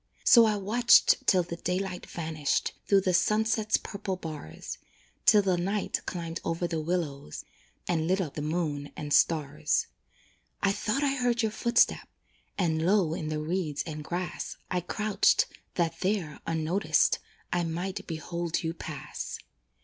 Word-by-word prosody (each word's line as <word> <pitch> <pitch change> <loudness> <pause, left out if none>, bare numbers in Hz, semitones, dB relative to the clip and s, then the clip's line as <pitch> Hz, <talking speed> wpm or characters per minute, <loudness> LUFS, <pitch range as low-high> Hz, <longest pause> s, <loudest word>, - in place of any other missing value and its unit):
So 235 -2 +8
I 215 -1 +2
watched 225 +5 +4
till 185 -3 +5
the 170 0 -6
daylight 180 +1 -3
vanished 155 -3 -1
Through 200 -1 +5
the 185 -1 +1
sunset's 220 +3 +2
purple 195 -2 -4
bars, 155 - -7 0.5
Till 210 -1 +7
the 185 -2 +1
night 195 +3 -1
climbed 170 -2 -4
over 165 +1 -1
the 165 -2 -2
willows, 150 - -3 0.4
And 165 -2 0
lit 185 +2 +2
up 165 -7 -2
the 150 - -4
moon 150 -2 -2
and 145 -3 -3
stars. 150 -2 +2 0.8
I 195 - +4
thought 230 +7 -1
I 275 -1 +2
heard 245 -3 +1
your 220 - +1
footstep, 235 +2 +2 0.5
And 160 -4 +1
low 185 -3 +3
in 155 -2 -3
the 155 - -2
reeds 155 -1 -2
and 155 -2 -6
grass 175 +3 -4
I 180 -1 +1
crouched, 210 +4 +2 0.3
that 165 -2 0
there, 185 -6 -1
unnoticed, 165 +5 +2 0.3
I 175 0 +1
might 175 +3 -4
behold 170 +2 -3
you 165 0 -1
pass. 150 -3 -6
175 Hz, 150 wpm, -28 LUFS, 160-195 Hz, 0.8 s, So